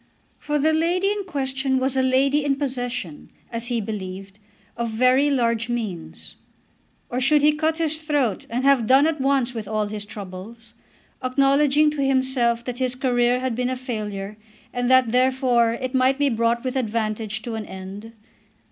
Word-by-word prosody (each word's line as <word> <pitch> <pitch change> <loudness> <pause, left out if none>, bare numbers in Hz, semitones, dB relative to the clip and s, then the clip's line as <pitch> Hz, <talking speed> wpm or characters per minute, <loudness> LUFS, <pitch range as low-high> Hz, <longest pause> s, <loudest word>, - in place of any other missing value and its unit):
For 295 0 -1
the 310 +2 +2
lady 350 +5 +1
in 410 -1 -3
question 265 -4 -1
was 260 +1 0
a 265 - +3
lady 270 +3 +2
in 280 -1 +1
possession, 245 - -4 0.2
as 230 0 -3
he 240 -2 0
believed, 195 -2 -6 0.4
of 235 0 -2
very 255 +5 +3
large 235 -4 0
means. 165 - -5 0.7
Or 250 +1 -1
should 290 +2 +3
he 300 - +6
cut 315 +1 -1
his 315 -1 -1
throat 290 - -1
and 245 +3 -2
have 270 -5 +3
done 270 +4 +6
at 315 -3 0
once 265 -2 +1
with 220 -3 -6
all 215 0 -1
his 210 0 -5
troubles, 205 +3 -10 0.5
acknowledging 280 +3 +3
to 290 -2 -2
himself 260 -3 +1
that 250 0 -5
his 255 -1 -1
career 250 -1 +1
had 260 -2 -1
been 250 +2 -1
a 255 - -2
failure, 210 -5 -5 0.4
and 245 0 -1
that, 260 -3 +4
therefore, 250 -2 +2
it 255 +2 -4
might 260 +1 +3
be 285 -1 +2
brought 230 0 0
with 255 0 -3
advantage 220 -2 -2
to 235 - -5
an 220 -2 -5
end? 195 +4 -9
250 Hz, 175 wpm, -23 LUFS, 225-275 Hz, 0.7 s, he